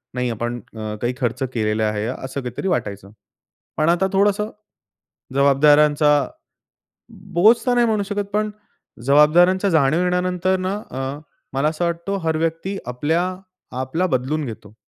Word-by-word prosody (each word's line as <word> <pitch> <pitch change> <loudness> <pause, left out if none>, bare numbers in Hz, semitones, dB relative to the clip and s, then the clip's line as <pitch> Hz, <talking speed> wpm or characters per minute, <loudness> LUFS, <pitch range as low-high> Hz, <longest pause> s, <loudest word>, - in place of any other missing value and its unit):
नाही 125 -1 -1
आपण 120 +2 -3
अ, 110 -2 -7
काही 120 +1 0
खर्च 125 +1 -1
केलेला 110 -1 0
आहे, 105 0 -2
असं 130 +2 -5
काहीतरी 125 - -4
वाटायचं, 100 - -3 0.7
पण 155 +2 +2
आता 175 +3 +2
थोडंस 200 +1 +3 0.9
जबाबदाऱ्यांचा 145 +2 +4 1.2
बोझ 215 +7 +6
तर 250 - +3
नाही 240 -1 +3
म्हणू 215 -2 +1
शकत, 205 0 -2
पण 215 0 +1 0.6
जबाबदाऱ्यांच्या 175 +7 +5
जाणीव 155 0 +3
येण्यानंतर 180 +1 +1
ना 185 +1 -2 0.2
अ, 130 - -5 0.5
मला 140 +3 +2
असं 160 +2 -2
वाटतो 170 +4 -2
हर 160 - +1
व्यक्ति 165 +4 -2
आपल्या 145 +8 0 0.6
आपला 160 +8 -1
बदलून 145 +5 -2
घेतो. 105 -2 -9
155 Hz, 135 wpm, -21 LUFS, 125-185 Hz, 1.2 s, बोझ